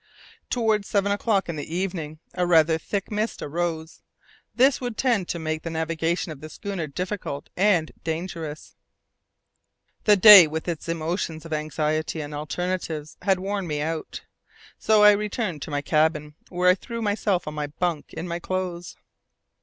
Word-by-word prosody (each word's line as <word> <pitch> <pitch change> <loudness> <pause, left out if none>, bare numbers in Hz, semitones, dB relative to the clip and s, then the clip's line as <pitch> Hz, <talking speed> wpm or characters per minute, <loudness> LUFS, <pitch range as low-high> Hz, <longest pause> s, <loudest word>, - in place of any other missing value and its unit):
Towards 220 -4 +1
seven 200 0 +1
o'clock 200 -1 +1
in 170 -2 -4
the 155 +3 -5
evening 175 -5 -3 0.2
a 180 -1 0
rather 160 -1 +4
thick 200 +5 -4
mist 215 +2 -2
arose; 160 +1 -3 0.5
this 265 +2 +4
would 245 -3 -4
tend 230 -9 +1
to - - -2
make 155 -1 -3
the 165 - -5
navigation 165 +1 -1
of 145 -3 -10
the 155 - -8
schooner 195 -3 -5
difficult 180 -2 -5
and 180 -5 +2
dangerous. 160 -2 -5 1.3
The 210 -1 +6
day, 195 -3 +11
with 160 +2 -5
its 165 -1 -4
emotions 165 0 -3
of 165 - -5
anxiety 155 +1 -1
and 150 -1 -6
alternatives, 155 0 -4
had 195 -2 +2
worn 195 -1 -3
me 150 -2 -2
out. 160 +1 -4 0.6
So 215 -1 +4
I 210 - +9
returned 205 - -2
to - - -6
my 145 0 -2
cabin, 150 0 +1 0.2
where 180 0 +3
I - - +5
threw 230 +4 -6
myself 205 -4 0
on 150 - -4
my 150 -1 -3
bunk 160 +1 -3
in 170 - -6
my 170 0 -3
clothes. 180 -1 -4
170 Hz, 160 wpm, -24 LUFS, 155-195 Hz, 1.3 s, day